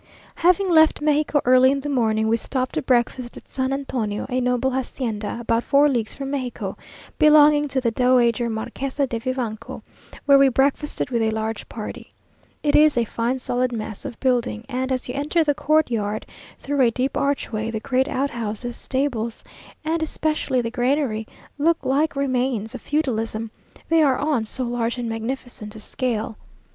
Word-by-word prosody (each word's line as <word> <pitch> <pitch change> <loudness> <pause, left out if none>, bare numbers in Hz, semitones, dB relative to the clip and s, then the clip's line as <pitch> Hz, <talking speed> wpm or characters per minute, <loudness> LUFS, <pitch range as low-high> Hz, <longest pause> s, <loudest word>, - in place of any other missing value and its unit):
Having 365 +2 +2
left 315 -1 +5
Mexico 300 -1 +2
early 255 +1 +6
in 275 - 0
the 285 - -5
morning, 220 -5 +1
we 225 - +3
stopped 255 +2 -2
to - - -1
breakfast 245 -1 0
at - - -13
San 260 0 -2
Antonio, 250 -7 -2
a 255 0 0
noble 250 +1 +1
hacienda, 240 -5 -3
about 230 0 0
four 285 +1 +4
leagues 235 -6 -1
from 275 -1 -5
Mexico, 245 -8 -3 0.4
belonging 300 -1 +6
to 270 -1 -1
the 240 -3 0
Dowager 240 -1 +3
Marquesa 265 +5 -2
de 235 -3 -4
Vivanco, 245 -3 -4 0.4
where 280 -1 +7
we 275 -1 +6
breakfasted 270 +1 0
with 235 -2 +1
a 220 - +2
large 220 0 -3
party. 215 -2 -7 0.5
It 295 - +2
is 300 -3 +5
a 235 - +3
fine 235 +4 -1
solid 250 0 -1
mass 220 -1 -5
of 270 -5 -7
building, 245 -3 0
and 260 0 -2
as 255 -1 -1
you 250 - -4
enter 300 +5 +1
the 295 -2 +2
courtyard, 235 -9 0 0.3
through 285 0 -1
a 245 - +5
deep 255 +3 -2
archway, 230 -6 -1
the 225 -1 -3
great 260 +2 0
outhouses, 240 -4 -3
stables, 245 -5 -2 0.4
and 325 +1 0
especially 305 -4 0
the 230 -1 -3
granary, 245 -3 0 0.3
look 325 +3 +2
like 290 +4 +1
remains 255 -5 -1
of - - -7
feudalism, 225 -6 -1 0.4
they 330 -1 +4
are 275 -4 +3
on 285 -6 0
so 255 +4 -3
large 240 0 -1
and 240 -1 -3
magnificent 225 -1 -5
a - - -8
scale. 225 -1 -3
255 Hz, 170 wpm, -23 LUFS, 230-280 Hz, 0.5 s, where